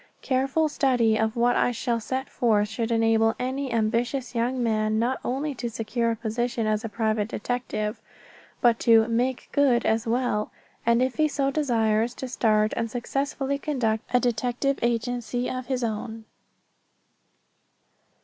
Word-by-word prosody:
Careful 270 +4 +1
study 250 -6 +2
of 220 +1 0
what 240 +1 +3
I - - +3
shall 235 0 -1
set 260 +4 -3
forth 215 -4 +1
should 225 +2 -2
enable 225 -1 +3
any 260 +1 -3
ambitious 235 +4 0
young 245 +2 0
man 215 -1 +1
not 245 +4 0
only 280 +4 -2
to 240 -2 -4
secure 230 +1 -1
a 230 - 0
position 230 +1 -2
as 215 0 0
a 225 - -4
private 215 -1 0
detective, 220 -2 -3 0.6
but 235 -2 +4
to 225 -1 +5
"make 245 +2 -1
good" 255 -5 +3
as 225 +2 +1
well; 230 -3 0 0.4
and 235 +1 +4
if 260 0 -2
he 310 -1 +4
so 275 -2 0
desires, 235 -5 +1
to 260 - -5
start 215 -3 +2
and 230 0 -2
successfully 275 +3 -2
conduct 235 -7 -1
a - - -17
private 250 - +3
detective 245 +3 0
agency 240 +1 -1
of 255 -1 -4
his 260 -2 -1
own. 220 0 -4
235 Hz, 155 wpm, -25 LUFS, 225-255 Hz, 0.6 s, to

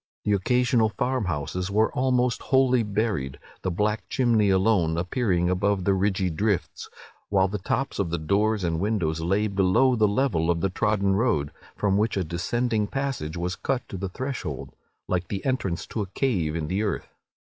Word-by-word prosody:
The 105 - +1
occasional 120 +2 +2
farm 125 +1 -1
houses 90 +3 -3
were 110 +2 +2
almost 125 -1 +1
wholly 130 -2 +3
buried, 105 - -1 0.2
the - - -1
black 105 +4 -1
chimney 115 -6 +2
alone 95 -4 +2
appearing 90 -1 0
above 95 +1 +1
the 100 - +3
ridgy 95 -1 +1
drifts; 100 +2 -2 0.4
while 95 -2 +3
the 105 +2 -4
tops 135 +8 -2
of 95 -4 0
the 85 - -1
doors 100 +6 +1
and 85 -2 0
windows 90 -6 0
lay 95 +6 +1
below 100 +6 +3
the 110 -2 +3
level 100 -7 +1
of 85 -1 +2
the 95 - 0
trodden 100 -1 +1
road, 100 - +1 0.2
from 100 -1 +1
which 105 0 +1
a 95 - +1
descending 105 +6 -1
passage 135 - -3
was 90 +1 -2
cut 135 -2 -2
to 95 - -5
the 95 +1 -4
threshold, 130 +7 -5 0.3
like 90 -1 -1
the 95 0 -5
entrance 115 -10 -1
to 110 - -4
a 100 - -3
cave 90 - 0
in 80 -2 -2
the 95 +5 -1
earth. 105 -5 -3
100 Hz, 180 wpm, -25 LUFS, 90-115 Hz, 0.4 s, wholly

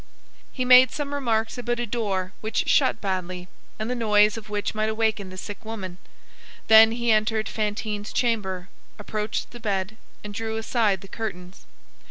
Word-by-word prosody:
He 255 - -2
made 250 0 +8
some 285 +1 -4
remarks 230 -4 -1
about 240 0 -2
a 240 - -1
door 200 -5 -2
which 220 0 -1
shut - - +3
badly, 185 -2 -3 0.3
and 215 +1 -3
the 250 - -1
noise 210 -3 +3
of 220 -2 -9
which 205 -1 -2
might 215 0 0
awaken 220 -3 0
the 185 - -10
sick 205 +2 -7
woman; 195 -5 -6 0.7
then 220 0 +8
he 235 0 +1
entered 215 0 +2
Fantine's 210 -1 -3
chamber, 190 -7 -1 0.3
approached 210 +1 -3
the 240 - -10
bed 205 -1 -2 0.3
and 210 0 -7
drew 220 +1 -3
aside 220 -4 +1
the 195 - -11
curtains. 185 -4 -7
215 Hz, 165 wpm, -25 LUFS, 200-225 Hz, 0.7 s, made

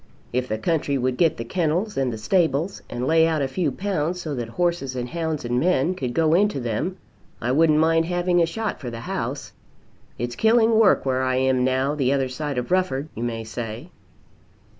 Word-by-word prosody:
If 125 +1 0
the 110 - -2
country 145 +2 0
would 130 0 0
get 165 +3 +2
the 115 - -4
kennels 175 - -1
and 135 -2 0
the 110 - -5
stables, 160 - 0
and 120 +1 -3
lay 160 +2 +4
out 155 -3 0
a - - 0
few 155 +2 -1
pounds 180 0 -2
so 155 -4 -4
that 120 -4 -4
horses 170 -3 -1
and 125 -1 -3
hounds 160 -4 -3
and 120 +1 0
men 175 +1 +2
could 125 -9 -4
go 160 -1 +3
into 200 -3 +2
them, 120 - -2 0.4
I 120 - -1
wouldn't 155 +2 +4
mind 165 +1 +3
having 175 0 +1
a 165 - +3
shot 220 +5 -3
for 125 - -5
the 115 -1 -7
house. - - -4 0.7
It's 120 +1 -3
killing 225 - +4
work 210 -9 +4
where 130 -1 +1
I 130 0 +1
am 130 -1 +2
now, 130 +2 +1
the 135 -3 +1
other 135 -2 0
side 145 +1 -4
of 125 +7 -3
Rufford, 180 -6 0
you 115 - -7
may 115 -1 -3
say." 115 +7 -6
145 Hz, 205 wpm, -23 LUFS, 125-175 Hz, 0.7 s, lay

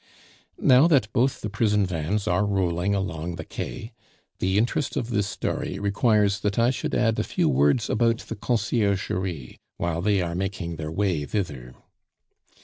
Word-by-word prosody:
Now 130 +5 +6
that 130 -10 +2
both 130 +5 +1
the 105 - -3
prison 105 -1 +2
vans 90 +5 -2
are 90 +2 +2
rolling 95 -1 0
along 90 -3 -3
the 80 -1 -7
Quai, 110 - -6 0.5
the 95 +1 +1
interest 120 +6 0
of 120 -2 -2
this 105 -2 +1
story 95 - -3
requires 100 0 +2
that 105 -1 -2
I 120 +2 +4
should 150 +3 -3
add 115 -2 +2
a - - +1
few - - 0
words 70 - +3
about 115 +1 +2
the - - -7
Conciergerie, 100 - -1 0.2
while 85 -1 -1
they 100 +1 +2
are 85 -2 -2
making 90 -2 -3
their 80 0 -5
way 90 -4 0
thither. 70 - -4
100 Hz, 160 wpm, -25 LUFS, 85-110 Hz, 0.5 s, Now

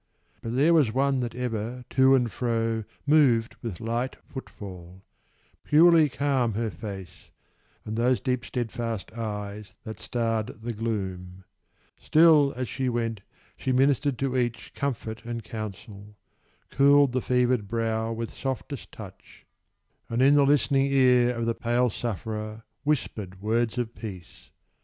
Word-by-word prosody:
But 115 +1 -4
there 150 +6 +4
was 145 -9 +4
one 135 +2 +1
that 120 -2 -3
ever, 125 0 -4
to 130 0 +5
and 120 -4 +1
fro, 115 -2 -1 0.2
Moved 135 -6 +4
with 115 -8 -5
light 120 +3 -2
footfall: 95 -8 -10 0.6
purely 160 0 +6
calm 130 -5 0
her 115 0 -1
face, 95 0 -9 0.6
And 110 - -4
those 120 +2 +2
deep 125 -2 -1
steadfast 115 -3 -4
eyes 105 -3 -5
that 110 - -8
starred 115 0 -1 0.2
the 120 0 -3
gloom: 95 -5 -4 0.6
Still, 155 -3 +5
as 125 0 -3
she 130 +1 -2
went, 115 -3 -2 0.3
she 130 - -2
ministered 135 +1 +2
to 135 -1 -1
each 120 -4 -2
Comfort 115 -5 -4
and 115 -1 -5
counsel; 105 -1 -8 0.6
cooled 140 0 +5
the 130 0 0
fevered 125 -4 +1
brow 115 0 -1
With 115 0 -4
softest 135 0 -5
touch, 100 -4 -12 0.6
and 115 - -1
in 135 +2 +6
the 145 -1 +5
listening 140 -1 +3
ear 125 -2 +4
Of 115 0 -2
the 115 - +1
pale 120 +1 +1
sufferer 110 0 -4 0.2
whispered 110 -10 -2
words 115 +3 0
of 120 -1 -2
peace. 95 -8 -10
120 Hz, 140 wpm, -26 LUFS, 110-130 Hz, 0.6 s, purely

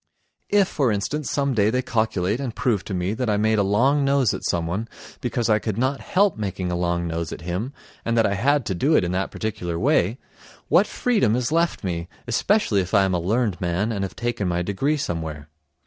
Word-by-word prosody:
If, 200 -2 +4
for 135 -10 +1
instance, 125 +8 -2
some 140 -1 0
day 105 -2 +3
they 125 +3 0
calculate 110 -2 0
and 125 -5 -4
prove 110 -7 0
to 100 - -5
me 90 +3 -1
that 120 0 -2
I 105 - +2
made 110 +1 +2
a - - +4
long 130 +9 +3
nose 135 -5 +3
at - - -5
someone 85 +6 -1 0.3
because 120 -1 -1
I 110 -1 +3
could 110 -2 -3
not 130 +3 0
help 195 0 +2
making 95 -3 -3
a - - -1
long 85 0 0
nose 85 0 -3
at - - -7
him 90 +9 -3 0.3
and 115 0 0
that 115 - +4
I 100 - +1
had 135 +6 +2
to 95 - -1
do 140 - +2
it - - +4
in 90 - -1
that 95 +1 -1
particular 90 -6 -4
way, 95 +6 +2 0.5
what - - +5
freedom 210 - +1
is 125 +2 -1
left 165 -4 +1
me, 85 -2 -3 0.2
especially 120 - +2
if 90 +3 -2
I 100 - +6
am 95 -1 +1
a 90 - +1
learned 105 +1 0
man 90 +5 0
and 100 -3 -2
have 95 - -5
taken 120 -4 -2
my 90 0 0
degree 135 - 0
somewhere? 80 - -4
105 Hz, 225 wpm, -23 LUFS, 90-125 Hz, 0.5 s, I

